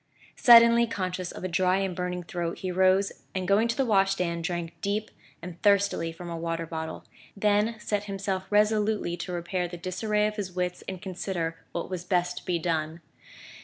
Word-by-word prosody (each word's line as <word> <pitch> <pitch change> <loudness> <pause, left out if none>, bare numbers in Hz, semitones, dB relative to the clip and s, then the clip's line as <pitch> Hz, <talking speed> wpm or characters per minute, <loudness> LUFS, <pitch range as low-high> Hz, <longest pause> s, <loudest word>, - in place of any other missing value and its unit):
Suddenly 235 -1 +7
conscious 185 -4 -3
of - - -9
a - - 0
dry 185 +1 +2
and 195 -2 -1
burning 180 0 -3
throat, 170 -1 -4
he 185 -2 -3
rose 190 +2 +3 0.2
and 185 -1 -2
going 205 +4 +4
to 230 - -2
the 270 - +2
washstand 195 -5 +1
drank 170 -1 -3
deep 210 +2 -2 0.3
and 175 -1 -8
thirstily 200 -5 +2
from 175 +2 -9
a 170 - -4
water 165 0 -3
bottle; 160 0 -6 0.3
then 210 +2 +2
set 210 -1 -2
himself 195 -1 -3
resolutely 210 -3 +2
to 175 +2 -5
repair 175 +1 -2
the 175 0 -8
disarray 210 +4 0
of 210 0 -2
his 190 -3 -4
wits 180 0 -2
and 190 0 -6
consider 175 -3 -3
what 170 - -3
was 180 -2 -5
best 180 0 0
to - - -8
be 175 - +1
done. 160 -1 -2
185 Hz, 185 wpm, -27 LUFS, 175-205 Hz, 0.3 s, Suddenly